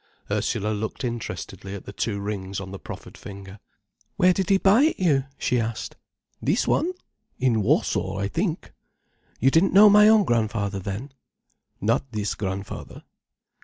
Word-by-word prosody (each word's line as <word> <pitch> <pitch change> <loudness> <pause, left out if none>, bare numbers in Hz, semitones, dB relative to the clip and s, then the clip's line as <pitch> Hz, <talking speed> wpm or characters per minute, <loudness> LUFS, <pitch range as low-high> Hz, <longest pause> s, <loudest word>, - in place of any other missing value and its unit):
Ursula 105 - 0
looked 110 +5 -4
interestedly 115 -4 -5
at 100 - -9
the 100 - -8
two 100 0 -2
rings 100 -2 -4
on 95 -1 -7
the 100 - -7
proffered - - -9
finger. 100 0 -10 0.6
"Where 180 0 +4
did 190 -1 -2
he 195 - +5
buy 200 +5 +5
it 320 - 0
you?" 145 -7 +2
she 125 - 0
asked. 115 0 -4 0.5
"This 165 - +1
one? 350 +4 +1 0.4
In 120 -4 +2
Warsaw, 95 -1 +1
I 100 0 -1
think." 170 - -2 0.7
"You 135 +3 +4
didn't 165 +6 +3
know 205 +2 +8
my 210 +1 +7
own 220 -1 +6
grandfather 105 - 0
then?" 100 +9 -5 0.7
"Not 115 +5 0
this 105 -1 -1
grandfather." 100 -1 -6
115 Hz, 155 wpm, -24 LUFS, -, 0.7 s, know